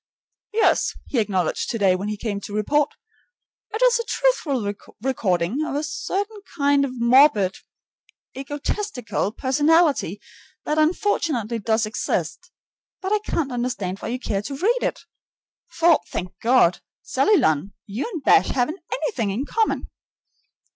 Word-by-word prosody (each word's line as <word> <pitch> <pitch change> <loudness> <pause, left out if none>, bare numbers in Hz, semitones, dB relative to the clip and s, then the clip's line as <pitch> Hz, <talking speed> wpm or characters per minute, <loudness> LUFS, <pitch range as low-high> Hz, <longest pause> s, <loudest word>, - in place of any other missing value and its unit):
"Yes," 440 +1 +2
he 255 - -1
acknowledged 190 -6 0
today 200 -5 +2
when 195 +3 -4
he 210 0 -3
came 205 -2 -3
to 205 - -7
report, 285 +8 +1 0.8
"it 435 +4 -1
is - - +5
a - - -1
truthful 285 - 0 0.3
record 195 -10 +1 0.2
of 310 - -3
a 295 - -1
certain 400 +7 -3 0.2
kind 285 -1 +3
of 255 -3 -4
morbid, 235 -6 +5 0.8
egotistical 275 - -3
personality 290 - +2 0.5
that 305 +1 0
unfortunately 310 - 0
does 220 +1 +1
exist. 215 - -3 0.5
But 380 +1 -4
I 425 - +3
can't 330 -9 -2
understand 240 -6 -3
why - - -6
you 240 +2 -2
care 200 -5 -2
to 270 +6 -6
read 455 - +2
it; - - -2 0.7
for, 335 -1 +4
thank 180 0 -4
God! 235 -7 +4 0.2
Sally 420 -1 +3
Lunn, 170 - +1
you 220 - -4
and 330 -8 -5
Bash - - +5
haven't 285 +9 -1
anything 255 - -1
in 225 +8 -2
common." 445 +6 0
260 Hz, 140 wpm, -23 LUFS, 210-325 Hz, 0.8 s, is